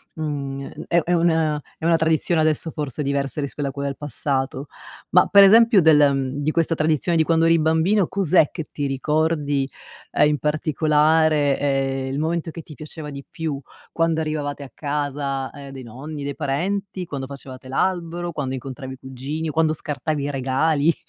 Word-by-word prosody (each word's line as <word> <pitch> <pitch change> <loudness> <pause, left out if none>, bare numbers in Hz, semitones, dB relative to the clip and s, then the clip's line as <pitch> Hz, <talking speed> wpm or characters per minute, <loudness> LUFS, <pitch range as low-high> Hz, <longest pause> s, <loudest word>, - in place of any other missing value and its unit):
mhmm, 140 -3 -4
gn - - -9
è 170 - +4
è 175 - 0
una 160 -3 +2 0.2
è 160 - -6
una 170 0 +5
tradizione 160 +1 +2
adesso, 155 +1 +1
forse, 150 -1 -4
diversa 140 0 -1
rispetto 140 0 -3
a - - -5
quel 140 0 -3
passato. 140 -1 -3 0.4
Ma 180 - +6
per 200 -1 +8
esempio 225 0 +7
del 155 -2 +6
ehm, 135 -2 +3
di 155 - +1
questa 165 0 +1
tradizione 155 +2 +1
di 160 - +4
quando 165 0 +2
eri 165 0 +5
bambino, 160 +5 +2
cos'è 185 -5 +3
che 160 - -5
ti 145 - -2
ricordi, 145 0 0 0.4
uhm, - - +4
in 150 0 +1
particolare? 155 0 +2
Ehm, 135 -1 0
il 140 - -2
momento 165 +1 -1
che 165 - -8
ti 150 - -12
piaceva 155 0 -8
di 140 -1 -8
più, 160 -5 -4 0.3
quando 165 -1 +1
arrivavate 150 -2 -3
a 130 - -11
casa, 140 -2 -2
ehm, 140 -1 -10
dei 135 -1 -8
nonni, 140 +6 -7
dei 140 - -4
parenti? 185 +6 -2
Quando 140 -4 -5
facevate 130 -1 -10
l'albero? 175 +2 -1
Quando 135 -3 -3
incontravi 130 0 -6
i - - -10
cugini? 135 +5 -5
O - - -2
quando 155 +1 +2
scartavi 150 -1 -3
i 145 - -2
regali? 140 +4 +2
150 Hz, 180 wpm, -22 LUFS, 140-160 Hz, 0.4 s, per